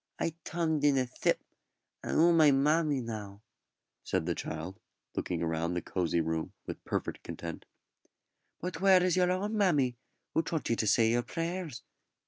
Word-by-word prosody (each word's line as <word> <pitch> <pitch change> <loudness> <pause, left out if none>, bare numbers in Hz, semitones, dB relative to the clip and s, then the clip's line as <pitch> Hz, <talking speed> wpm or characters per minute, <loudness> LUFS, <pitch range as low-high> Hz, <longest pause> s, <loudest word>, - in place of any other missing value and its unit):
"I 165 - -1
tomed 160 -3 -1
in 145 -2 +4
a 130 - +2
s'ip, 125 - 0 0.6
and - - -2
'ou 170 +2 +6
my 160 -3 +6
mammy 145 +1 +3
now," 105 -3 -7 0.6
said 80 - -1
the 85 - 0
child, 85 +6 -5 0.4
looking 85 -1 -1
round 80 +2 -1
the 90 - -1
cosy 85 -2 0
room 80 0 -2
with - - -7
perfect - - -3
content. 85 -1 -7 0.9
"But 175 -1 -5
where 190 -2 +6
is 180 -2 +2
your 180 -1 +3
own 200 +4 -1
mammy, 145 - +2 0.4
who 160 - +3
taught 160 -6 -2
you - - +3
to 110 - -1
say 110 +2 +4
your 120 +1 +2
prayers?" 165 +1 -4
135 Hz, 165 wpm, -31 LUFS, -, 0.9 s, ou